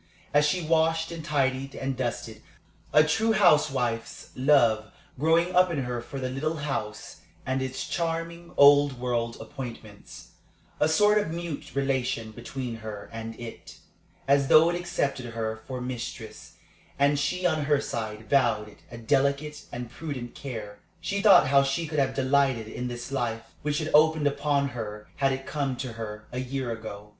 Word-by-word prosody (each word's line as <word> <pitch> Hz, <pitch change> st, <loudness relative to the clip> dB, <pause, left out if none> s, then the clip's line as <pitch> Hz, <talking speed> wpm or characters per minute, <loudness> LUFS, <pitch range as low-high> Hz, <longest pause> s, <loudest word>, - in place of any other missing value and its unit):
As 150 Hz, +1 st, +5 dB
she 175 Hz, +3 st, 0 dB
washed 160 Hz, +1 st, +2 dB
and 165 Hz, -2 st, -6 dB
tidied 135 Hz, -3 st, 0 dB
and 135 Hz, 0 st, -3 dB
dusted, 115 Hz, -3 st, -4 dB, 0.5 s
a 150 Hz, -, +7 dB
true 220 Hz, +9 st, +2 dB
housewife's 135 Hz, -, +2 dB
love 120 Hz, -6 st, +3 dB, 0.3 s
growing 165 Hz, +4 st, +3 dB
up 180 Hz, 0 st, +6 dB
in 150 Hz, -6 st, -1 dB
her 125 Hz, -1 st, -3 dB
for 135 Hz, +3 st, -7 dB
the 130 Hz, -, -2 dB
little 155 Hz, +5 st, -2 dB
house 135 Hz, -8 st, -4 dB, 0.3 s
and 130 Hz, +1 st, -1 dB
its 130 Hz, 0 st, -4 dB
charming, 170 Hz, 0 st, -3 dB
old 145 Hz, -2 st, +6 dB
world 120 Hz, -2 st, -1 dB
appointments 115 Hz, -7 st, -9 dB, 0.5 s
a 150 Hz, -, +3 dB
sort 210 Hz, +6 st, +4 dB
of 205 Hz, -, -2 dB
mute 170 Hz, -4 st, -6 dB
relation 130 Hz, -5 st, -1 dB
between 120 Hz, +1 st, -6 dB
her 110 Hz, -2 st, -8 dB
and 115 Hz, 0 st, -6 dB
it, 115 Hz, -1 st, -9 dB, 0.5 s
as 140 Hz, 0 st, +4 dB
though 160 Hz, +4 st, +7 dB
it -, -, -2 dB
accepted 140 Hz, -8 st, -2 dB
her 110 Hz, -1 st, -2 dB
for 130 Hz, -1 st, -4 dB
mistress, 125 Hz, -1 st, -6 dB, 0.4 s
and 140 Hz, +1 st, +3 dB
she 180 Hz, +6 st, -1 dB
on 155 Hz, -4 st, +1 dB
her 145 Hz, -1 st, +3 dB
side 110 Hz, -5 st, -5 dB
vowed 120 Hz, -6 st, +2 dB
it 105 Hz, -, -18 dB
a 120 Hz, -, -9 dB
delicate 140 Hz, +5 st, 0 dB
and 120 Hz, -1 st, -6 dB
prudent 135 Hz, -7 st, -6 dB
care 110 Hz, -7 st, -7 dB, 0.2 s
she 195 Hz, +4 st, -2 dB
thought 200 Hz, -10 st, +7 dB
how 140 Hz, 0 st, +6 dB
she 135 Hz, +5 st, -1 dB
could 155 Hz, -1 st, -2 dB
have 135 Hz, -1 st, +1 dB
delighted 135 Hz, -4 st, +2 dB
in 125 Hz, +3 st, -4 dB
this 120 Hz, +2 st, -6 dB
life 120 Hz, -4 st, -3 dB
which 150 Hz, 0 st, -1 dB
had 155 Hz, -1 st, -2 dB
opened 155 Hz, 0 st, +5 dB
upon 140 Hz, 0 st, +1 dB
her 105 Hz, -4 st, -6 dB
had 135 Hz, -1 st, +2 dB
it 135 Hz, 0 st, -4 dB
come 140 Hz, -3 st, -2 dB
to 125 Hz, -2 st, -5 dB
her 105 Hz, -1 st, -7 dB
a 125 Hz, -, -4 dB
year 130 Hz, -1 st, -3 dB
ago. 105 Hz, -2 st, -7 dB
135 Hz, 170 wpm, -27 LUFS, 120-150 Hz, 0.5 s, a